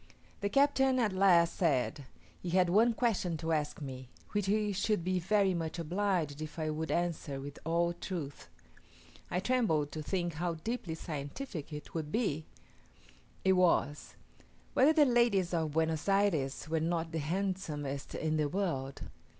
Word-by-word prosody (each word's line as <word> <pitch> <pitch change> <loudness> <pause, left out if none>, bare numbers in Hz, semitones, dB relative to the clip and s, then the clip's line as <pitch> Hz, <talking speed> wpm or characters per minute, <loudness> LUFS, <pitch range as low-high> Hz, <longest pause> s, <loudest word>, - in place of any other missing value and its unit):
The 200 - -1
captain 270 0 +3
at 220 -6 +2
last 180 -3 +4
said, 145 -3 0 0.4
he 180 - -4
had 180 0 +3
one 225 +4 +4
question 195 -9 0
to 160 +1 -3
ask 150 -2 -1
me, 130 -2 -7 0.2
which 205 -2 0
he 210 +1 +2
should 195 -1 0
be 185 +1 +1
very 195 +1 +2
much 165 -1 -3
obliged 170 -3 -1
if 155 +1 -6
I 155 -1 -1
would 160 +1 -3
answer 170 -5 -1
with 140 +1 -8
all 170 +1 +1
truth. 170 -5 -6 0.8
I 180 - 0
trembled 185 - +1
to 155 - -5
think 175 +1 -2
how 170 +2 -2
deeply 175 -1 -4
scientific 155 - -6
it 150 0 -8
would 155 -2 -3
be: 160 -9 -1 1.0
it 190 - +6
was, 170 -5 +2 0.6
"Whether 275 +4 +6
the 305 -2 +6
ladies 235 -8 +3
of 160 -3 0
Buenos 160 +2 0
Ayres 170 -10 +1
were 160 +1 0
not 165 0 -1
the 165 - -2
handsomest 155 -5 -3
in 155 0 0
the 150 -1 +1
world." 145 -7 -2
170 Hz, 160 wpm, -32 LUFS, 155-195 Hz, 1.0 s, it